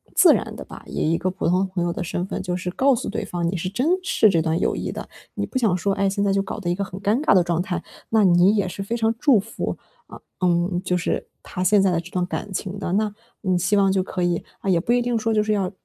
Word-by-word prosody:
自 - - +7
然 - - -2
地 - - -7
吧， - - -11
以 155 - -1
一 - - +3
个 185 - -1
普 185 0 -3
通 185 +3 +2
朋 185 -2 -2
友 175 0 -1
的 180 - -4
身 175 +1 -3
份 - - -4
就 180 -1 -2
是 180 0 -4
告 265 +7 +3
诉 - - -4
对 225 - -3
方， 175 -3 -2
你 180 - -1
是 180 +2 -3
珍 250 +9 -1 0.2
视 225 - +4
这 165 -3 +2
段 160 +1 0
友 - - 0
谊 - - -3
的。 - - -7 0.3
你 - - -2
不 - - -4
想 215 -7 +2
说， 195 +2 0
诶， 195 0 +1
现 200 +1 -1
在 200 -1 +2
就 195 - +2
搞 195 - -5
得 180 -4 -3
一 - - 0
个 200 - -2
很 190 -1 -7
尴 210 +6 +1
尬 310 - +4
的 180 - +5
状 170 -1 0
态， 175 -1 -3 0.3
那 220 -1 +3
你 180 +2 +5
也 200 -3 +1
是 185 - -6
非 230 +4 -2
常 225 -1 +1
祝 275 -7 +5
福， 225 +4 -4 0.3
啊， - - -11 0.2
嗯， 175 0 +1
就 180 -1 0
是 175 - -2 0.2
他 180 - -4
现 205 +3 +4
在 195 -1 +3
的 170 - +1
这 170 +1 -9
段 180 -1 0
感 190 +2 -5
情 190 +1 -4
的。 180 -3 -3
那， 210 +1 +1 0.3
你 185 -3 +1
希 185 +4 +1
望 195 -1 +4
就 190 0 +2
可 180 -1 -3
以 175 -1 0 0.2
啊， 195 - -2
也 175 -3 +4
不 195 - -1
一 245 - +3
定 240 -1 0
说， 225 +1 0
就 215 -1 +3
是 215 0 0
要 195 -3 0
190 Hz, 320 characters per minute, -23 LUFS, 180-210 Hz, 0.3 s, 自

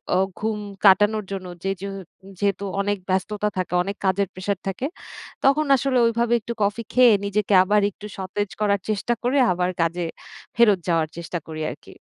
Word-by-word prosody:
অ - - +4 0.2
ঘুম 215 -1 -1 0.3
কাটানোর 205 +2 +5
জন্য 190 -2 -5 0.2
জেজু 195 0 -3 0.5
যেহেতু 200 -1 0 0.2
অনেক 205 0 0
ব্যস্ততা 210 +3 0
থাকে, 185 -1 -2
অনেক 200 +2 -5
কাজের 190 +1 +2
প্রেশার 185 +1 -3
থাকে। 195 +8 -3 0.6
তখন 300 +3 +4
আসলে 265 -1 0
ওইভাবে 235 +1 +1
একটু 235 - -5
কফি 210 +3 -1
খেয়ে, 250 -3 +7
নিজেকে 205 0 0
আবার 205 +2 +3
একটু 210 - -12
সতেজ 190 +2 -3
করার 200 -1 +2
চেষ্টা 215 +3 0
করে 255 +4 +1
আবার 180 0 0
কাজে 170 +1 0 0.5
ফেরত 210 -5 +5
যাওয়ার 165 -2 +2
চেষ্টা 170 +1 -4
করি 155 0 -6
আরকি। - - -13
200 Hz, 165 wpm, -23 LUFS, 185-215 Hz, 0.6 s, খেয়ে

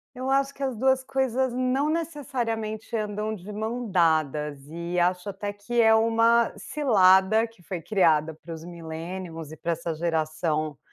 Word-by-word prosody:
Eu 260 +1 -3
acho 275 0 +2
que 280 - -9
as 260 -4 -1
2 265 +2 +2
coisas 260 -1 0
não 255 +3 +1
necessariamente 240 -9 -3
andam 215 0 -2
de 200 +1 -10
mãos 225 +2 -3
dadas 155 -5 +1
e 170 +2 -5
acho 180 +2 +1
até 205 +1 -4
que 210 +4 -1
é 225 0 +6
uma 230 +1 +4
cilada 215 -5 +4
que 225 -6 -22
foi 180 -3 -5
criada 160 -5 +2
para 165 +2 -9
os 160 0 -9
Millennials 165 -1 -7
e 160 - -9
pra 170 +3 -2
essa 170 0 -3
Geração 155 -2 -1
205 Hz, 160 wpm, -26 LUFS, 165-240 Hz, -, é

